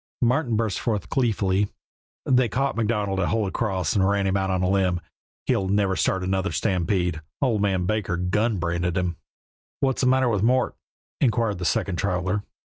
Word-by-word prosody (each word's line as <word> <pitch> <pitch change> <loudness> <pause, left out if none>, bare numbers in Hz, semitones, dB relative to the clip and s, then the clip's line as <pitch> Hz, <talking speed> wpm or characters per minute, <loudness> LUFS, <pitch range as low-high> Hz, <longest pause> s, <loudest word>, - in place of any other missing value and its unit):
Martin 125 0 +2
burst 110 -2 0
forth, 105 -6 -2
gleefully: 105 -6 +1 0.6
"They 125 -2 +3
caught 135 +5 0
MacDonald 105 -4 0
at 90 - +1
Holy 110 -4 0
Cross 95 -8 -1
and 95 -1 +3
ran 100 -1 +1
him 95 0 +1
out 95 -1 0
on 95 -1 0
a - - +2
limb. 95 -2 +2 0.5
He'll 95 - +1
never 100 -1 +1
start 95 0 0
another 95 +2 0
stampede. 90 -4 0 0.2
Old 120 -7 +1
man 95 -3 +1
Baker 100 -3 -1
gun 105 +5 0
branded 85 +1 -1
him." 90 -2 -1 0.6
"What's 135 -2 +1
the 130 - +3
matter 130 0 +3
with 105 -5 +1
Mort?" 125 +3 +2 0.4
inquired 115 -6 +1
the 90 - -3
second 90 +2 0
traveler. 90 +1 0
100 Hz, 175 wpm, -24 LUFS, 95-115 Hz, 0.6 s, They